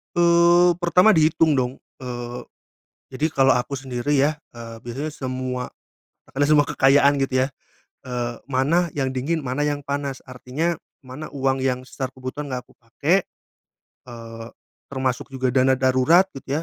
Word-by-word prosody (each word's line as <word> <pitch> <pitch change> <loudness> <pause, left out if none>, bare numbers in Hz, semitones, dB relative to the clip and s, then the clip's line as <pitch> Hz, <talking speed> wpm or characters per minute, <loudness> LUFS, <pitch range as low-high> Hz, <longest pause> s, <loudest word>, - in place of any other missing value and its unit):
Eee, 175 +1 +5
pertama 180 +4 +5
dihitung, 160 -3 +3
dong, 125 0 -1 0.3
eee, 120 -1 -6 0.7
jadi 150 +5 0
kalau 135 -3 +3
aku 125 +3 -1
sendiri, 130 +2 -2
ya, 150 +3 +1 0.2
eee, 115 -1 -9
biasanya 135 +6 -5
semua 130 -2 -4 0.9
semua 150 -1 +5
kekayaan, 140 +1 +4
gitu, 130 -1 +1
ya, - - -4 0.6
eee, 120 -2 -3
mana 140 +6 +1
yang 135 -2 -1
dingin 140 +6 -2
mana 135 +2 -2
yang 145 -1 -1
panas. 140 -1 -4
Artinya 140 +7 -2 0.2
mana 130 +4 -9
uang 135 -1 0
yang 125 -1 0
secara 130 -1 -5
kebutuhan 130 +2 -6
nggak 125 - -3
aku - - -20
pakai, 150 +11 0 0.8
eee, 115 -1 -9 0.4
termasuk 130 -2 -2
juga 130 -1 0
dana 130 +1 +3
darurat, 130 +9 +3
gitu, 140 +3 -4
135 Hz, 140 wpm, -22 LUFS, 125-150 Hz, 0.9 s, Eee